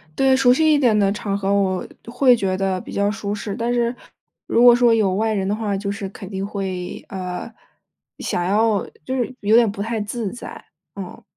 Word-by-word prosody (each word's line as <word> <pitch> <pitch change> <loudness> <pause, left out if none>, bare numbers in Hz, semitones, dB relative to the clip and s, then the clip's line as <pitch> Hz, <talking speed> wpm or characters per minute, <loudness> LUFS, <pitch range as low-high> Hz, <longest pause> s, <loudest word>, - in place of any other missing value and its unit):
对， 265 -1 +4
熟 255 -2 +5
悉 315 +3 +3
一 290 - +3
点 235 -6 +3
的 200 -1 +3
场 200 -1 -2
合， 200 0 0
我 190 -2 0 0.2
会 250 +1 +4
觉 190 -4 -1
得 190 -1 -1
比 - - -10
较 200 0 +1
舒 210 -1 -4
适。 200 0 -5
但 240 +1 -1
是， 240 0 0 0.5
如 235 - +3
果 240 -1 +9
说 240 -1 +4
有 205 -4 +2
外 220 +2 0
人 195 -2 -1
的 205 - 0
话， 210 -3 -2
就 200 0 -3
是 200 -1 -5
肯 195 -1 -10
定 195 -1 -4
会， 190 -3 -5
呃， 185 +3 -5 0.7
想 175 - -2
要 210 +1 +2 0.2
就 260 - -2
是 255 0 -2
有 210 +2 +3
点 235 -3 +5
不 200 - -6
太 225 0 -2
自 210 -1 -4
在。 240 - -9 0.3
嗯。 190 -3 -8
205 Hz, 225 characters per minute, -21 LUFS, 195-235 Hz, 0.7 s, 果